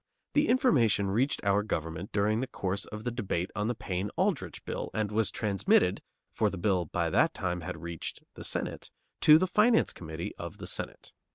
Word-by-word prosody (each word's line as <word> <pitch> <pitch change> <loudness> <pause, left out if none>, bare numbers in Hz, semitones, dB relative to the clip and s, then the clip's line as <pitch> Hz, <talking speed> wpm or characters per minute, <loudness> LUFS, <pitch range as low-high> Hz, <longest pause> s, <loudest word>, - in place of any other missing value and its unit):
The 295 +1 +3
information 120 - +3
reached 130 +8 +1
our 100 +1 +3
government 80 -2 -4
during 105 +2 +2
the 130 - -2
course 95 -2 -2
of 105 0 -8
the 120 - -1
debate 100 -6 -2
on 105 +1 0
the 120 - -1
Payne 95 0 -3
Aldrich 160 - -1
Bill - - -4
and 105 -1 0
was 110 0 +2
transmitted, 95 -3 +2 0.3
for 110 - +2
the 95 - -6
bill 90 -1 +1
by - - -1
that - - +3
time 90 -1 -2
had 80 - -6
reached 85 -1 -5
the - - -9
Senate, - - -3 0.3
to 155 0 +8
the 185 - +2
Finance 215 +5 +3
Committee 80 0 -6
of - - -6
the - - -7
Senate. - - -5
105 Hz, 190 wpm, -30 LUFS, 90-120 Hz, 0.3 s, to